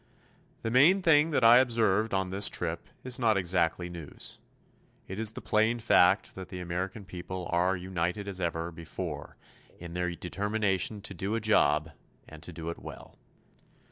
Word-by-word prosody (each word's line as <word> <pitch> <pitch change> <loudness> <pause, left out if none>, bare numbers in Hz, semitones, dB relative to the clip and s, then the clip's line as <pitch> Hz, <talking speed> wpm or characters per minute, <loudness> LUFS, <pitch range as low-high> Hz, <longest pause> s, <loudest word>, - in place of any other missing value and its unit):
The 115 - -2
main 165 +10 +5
thing 160 -1 +5
that 145 -6 +1
I 115 +2 +9
observed 115 -4 +2
on 95 -1 -1
this 100 +2 +3
trip 85 -1 -3 0.2
is 125 -1 -1
not 110 -4 +3
exactly 90 -1 0
news. 85 -4 -7 0.7
It 95 +2 -6
is 110 -1 +1
the - - -7
plain 110 +2 +2
fact 100 -4 +3
that 95 -1 -9
the 90 - -7
American 90 +3 -4
people 90 0 -6
are 90 +2 +2
united 90 +2 -3
as 95 -2 -3
never 85 -1 -2
before 80 -2 -7 0.4
in 85 0 -9
their 90 +1 -1
determination 100 +3 -1
to 100 - -4
do 95 +4 -2
a - - 0
job 80 -8 +2 0.4
and 80 -1 -12
to 90 - -7
do 85 0 -5
it - - -9
well. - - -11
95 Hz, 170 wpm, -29 LUFS, 85-110 Hz, 0.7 s, I